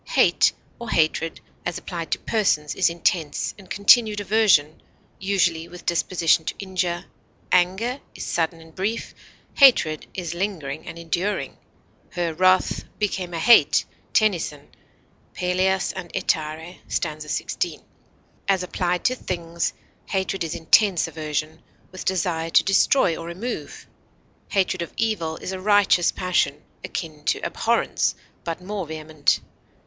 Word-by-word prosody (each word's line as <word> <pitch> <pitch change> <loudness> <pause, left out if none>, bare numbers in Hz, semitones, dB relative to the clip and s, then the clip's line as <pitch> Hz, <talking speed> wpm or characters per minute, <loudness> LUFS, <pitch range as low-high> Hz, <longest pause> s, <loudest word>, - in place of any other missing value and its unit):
Hate, - - +5 0.3
or 235 - -6
hatred, 160 +1 +1 0.2
as 175 0 -3
applied 170 -2 -6
to - - 0
persons, 175 -9 0
is - - +3
intense 170 -2 -1
and 190 -3 -16
continued 210 +1 +5
aversion, 200 -7 +3 0.4
usually 175 -4 +1
with 175 0 -12
disposition 170 -1 +2
to - - -3
injure; 180 -3 -2 0.5
anger 190 +9 +2
is - - -6
sudden 165 0 -1
and 160 0 -16
brief, 205 +6 -3 0.4
hatred 195 - +5
is 175 -3 -4
lingering 170 -6 -4
and - - -7
enduring; 175 +5 -2 0.6
"Her 170 -2 -1
wrath 185 +3 +3
became 190 -4 -2
a - - -2
hate," 235 +9 +6 0.3
TENNYSON 170 -9 +1 0.7
Pelleas 185 +1 +1
and 175 -2 -6
Ettarre 160 +3 -2
st. 155 -2 -2
16. 150 -1 -3 0.6
As 190 -2 +2
applied 180 -1 -1
to 255 - +4
things, 170 -7 -3 0.4
hatred 190 -1 -1
is 165 -1 -3
intense 180 +2 +4
aversion, 155 0 -4 0.3
with 185 - -8
desire 165 -3 0
to - - +5
destroy 195 -1 +3
or 165 - -7
remove; 195 +9 -6 0.6
hatred 185 -2 +1
of 170 - -5
evil 190 -8 -1
is - - -5
a 190 -1 -5
righteous 205 -3 +4
passion, 175 -5 0 0.2
akin 155 -3 -6
to - - +1
abhorrence, - - 0 0.3
but 170 +2 -5
more 195 -2 -4
vehement. 155 -1 0
175 Hz, 130 wpm, -23 LUFS, 160-195 Hz, 0.7 s, hate